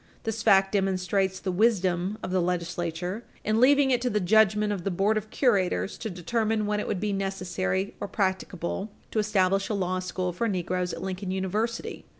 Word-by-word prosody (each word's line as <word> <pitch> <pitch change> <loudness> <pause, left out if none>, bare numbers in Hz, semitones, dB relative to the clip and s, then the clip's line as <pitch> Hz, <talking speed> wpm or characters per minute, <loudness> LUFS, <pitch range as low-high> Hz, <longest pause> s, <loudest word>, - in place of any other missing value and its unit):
This 225 -1 -2
fact 195 -1 +5
demonstrates 190 -1 0
the 190 - -2
wisdom 190 -2 +1
of - - -4
the 185 -1 +2
legislature 175 +3 -2 0.2
in 215 +2 +1
leaving 275 +1 +5
it 245 -1 +2
to 250 - +1
the 210 - +1
judgment 210 +2 +3
of 190 -4 -5
the 195 - 0
board 195 +4 +1
of 215 0 -3
curators 185 - +1
to 225 - -4
determine 215 +4 -1
when 210 0 0
it - - -3
would 185 - -1
be 205 +1 -1
necessary 190 0 -2
or 205 - -3
practicable 190 0 -2 0.2
to 220 - 0
establish 195 -2 +2
a 215 - 0
law 185 -1 -1
school 185 0 -3
for 230 +7 -1
negroes 180 -2 -1
at 165 - -6
Lincoln 190 0 -4
University. 195 +5 -2
195 Hz, 185 wpm, -27 LUFS, 185-215 Hz, 0.2 s, fact